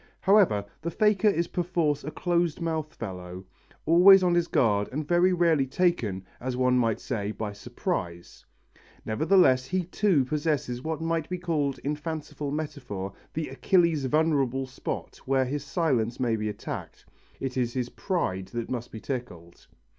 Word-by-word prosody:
However, 190 - +4 0.2
the 170 - -2
faker 210 +3 +2
is 170 -4 +2
perforce 170 -5 0
a 150 - -4
close 170 -1 0
mouthed 160 -2 -3
fellow, 90 -3 -7 0.4
always 185 +4 +8
on 180 -1 +3
his 175 -1 +2
guard 105 -8 +2
and 145 +3 -3
very 175 +2 +4
rarely 165 -6 +3
taken, 125 - 0
as 125 0 -3
one 125 0 +3
might 115 -3 +1
say, 105 -5 -3
by 105 0 -5
surprise. 85 -3 -5 0.6
Nevertheless 130 - +3
he 185 +5 -1
too 180 -5 +2
possesses 145 -4 -1
what 160 -1 -3
might 165 -1 -1
be 180 - -2
called 155 -6 -1
in 145 +2 -1
fanciful 150 -1 -5
metaphor 125 -10 -5 0.2
the 160 0 -2
Achilles' 165 0 +2
vulnerable 135 -3 +1
spot 130 0 -6
where 135 -1 +2
his 140 +2 -3
silence 135 -7 0
may 120 -3 +1
be 110 -1 -2
attacked: 105 - -7 0.3
it 135 -1 -4
is 120 -2 0
his 125 -2 -2
pride 95 - -2
that 115 +4 -5
must 120 -1 -4
be 110 - -7
tickled. 100 -11 -7
140 Hz, 155 wpm, -27 LUFS, 120-170 Hz, 0.6 s, always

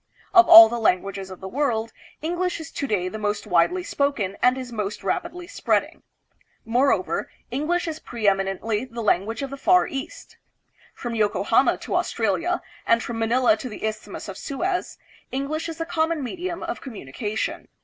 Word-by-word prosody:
Of 355 -2 +7
all 225 0 +12
the 235 +1 -3
languages 195 -2 0
of 185 - -10
the 190 - -6
world, 230 -2 -1 0.3
English 350 +2 -1
is 320 0 -8
to 275 - -3
day 190 -6 0
the 215 +4 -5
most 210 0 -2
widely 210 - +2
spoken 280 - -1
and 250 +1 +4
is 255 -2 -6
most 210 -3 -4
rapidly 355 0 -3
spreading. - - -1 0.6
Moreover, 245 +5 +1 0.2
English 330 +6 0
is 315 -1 -4
pre 230 -7 -3
eminently 195 +3 0
the 235 -2 -6
language 215 +5 +1
of 275 - -5
the 275 - -6
Far 360 +7 +4
East. 270 -1 -7 0.6
From 240 -2 -5
Yoko 210 -2 +1
hama - - +4
to - - -4
Australia, - - 0 0.2
and 230 0 +3
from 235 -1 -4
Manila 235 +1 +3
to 250 +4 -6
the 215 - -6
Isthmus 215 0 -5
of - - -7
Suez, 355 +6 -2 0.3
English 290 +5 -2
is 325 - -6
the 330 - -3
common 325 -2 0
medium 345 +6 -4
of 345 +1 -4
communication. 215 - -4
240 Hz, 170 wpm, -24 LUFS, 215-315 Hz, 0.6 s, all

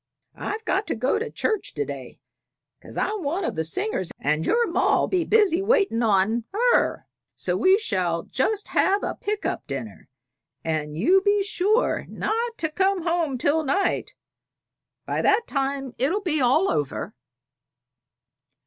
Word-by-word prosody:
"I've 440 +1 -5
got 400 0 0
to - - -1
go 255 - +1
to 460 +1 -3
church 435 -2 -2
to 430 - -1
day, - - -8 0.6
'cause - - -11
I'm 425 -1 -1
one 335 +6 -2
of - - -2
the 160 - -1
singers, 190 - -2
and 150 +2 0
your 475 0 +3
ma'll 360 -4 +2
be 365 -2 +1
busy 410 -5 +3
waitin' 390 - +2
on 220 +1 +2 0.3
her; - - +1 0.3
so - - -2
we 375 +1 +5
shall 180 - -1
just 410 +10 -1
have 400 +2 +2
a - - -1
pick 420 0 -4
up - - -3
dinner, - - -7 0.5
and 155 -2 -2
you 365 - +4
be 405 0 +3
sure 420 +3 +1
not 460 +1 -2
to 315 -2 -2
come 380 +2 +1
home 335 -5 0
till 295 +5 +1
night; 340 +8 0 0.9
by - - -1
that 435 +3 +3
time 275 -2 -2
it'll 335 +11 +1
be 315 -6 0
all 265 +10 +3
over." 145 -2 -2
350 Hz, 155 wpm, -24 LUFS, 250-415 Hz, 0.9 s, we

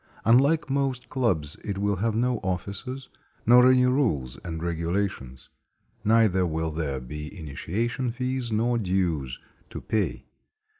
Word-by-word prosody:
Unlike 140 +9 +4
most 135 -2 -1
clubs, 90 - 0
it 100 -2 -3
will 100 0 0
have 110 +3 0
no 120 0 +1
officers, 100 +8 -4 0.4
nor 125 +2 +7
any 130 -1 +5
rules 110 - +1
and 80 -2 -5
regulations; 85 -6 -3 0.5
neither 110 -4 +4
will 80 -1 -1
there 75 -4 -2
be 75 +8 -7
initiation 110 - -2
fees 125 0 -3
nor 115 +2 +1
dues 90 - -1 0.3
to - - -6
pay. 110 -2 -2
100 Hz, 130 wpm, -26 LUFS, 80-125 Hz, 0.5 s, nor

